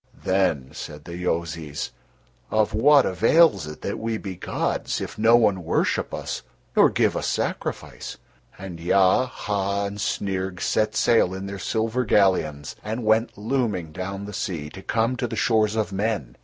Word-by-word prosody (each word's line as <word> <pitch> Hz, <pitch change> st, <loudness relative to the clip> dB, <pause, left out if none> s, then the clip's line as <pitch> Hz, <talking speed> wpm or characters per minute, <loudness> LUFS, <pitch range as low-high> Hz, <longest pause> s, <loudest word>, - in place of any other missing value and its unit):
Then 95 Hz, -9 st, +1 dB
said 75 Hz, -1 st, -8 dB
the 85 Hz, -, -7 dB
Yozis: 80 Hz, -4 st, -3 dB, 0.6 s
"Of 110 Hz, -1 st, +1 dB
what 140 Hz, +6 st, +6 dB
avails 105 Hz, -, +4 dB
it 75 Hz, -, -9 dB
that -, -, -3 dB
we 115 Hz, 0 st, -2 dB
be 95 Hz, -3 st, -6 dB
gods -, -, -2 dB
if -, -, -5 dB
no 115 Hz, +2 st, +6 dB
one 105 Hz, -6 st, +3 dB
worship -, -, 0 dB
us -, -, -4 dB, 0.3 s
nor -, -, +6 dB
give -, -, +1 dB
us -, -, -2 dB
sacrifice?" -, -, -3 dB, 0.4 s
And 90 Hz, -3 st, -8 dB
Ya, 95 Hz, +8 st, +3 dB
Ha, 100 Hz, -4 st, -2 dB
and 100 Hz, +1 st, -5 dB
Snyrg 95 Hz, -2 st, -2 dB
set 110 Hz, 0 st, 0 dB
sail 115 Hz, -6 st, +3 dB
in 95 Hz, +1 st, -5 dB
their 100 Hz, 0 st, -6 dB
silver 115 Hz, +4 st, 0 dB
galleons, 80 Hz, -, +2 dB
and 110 Hz, +2 st, -4 dB
went 110 Hz, +1 st, +2 dB
looming 105 Hz, -, -1 dB
down 95 Hz, +4 st, -5 dB
the 105 Hz, -, -8 dB
sea 75 Hz, -6 st, -4 dB
to 95 Hz, -, -10 dB
come 115 Hz, +5 st, 0 dB
to 120 Hz, -, -1 dB
the -, -, -5 dB
shores 110 Hz, -2 st, +2 dB
of 110 Hz, -3 st, -1 dB
men. 95 Hz, -, -2 dB
100 Hz, 165 wpm, -24 LUFS, 90-110 Hz, 0.6 s, what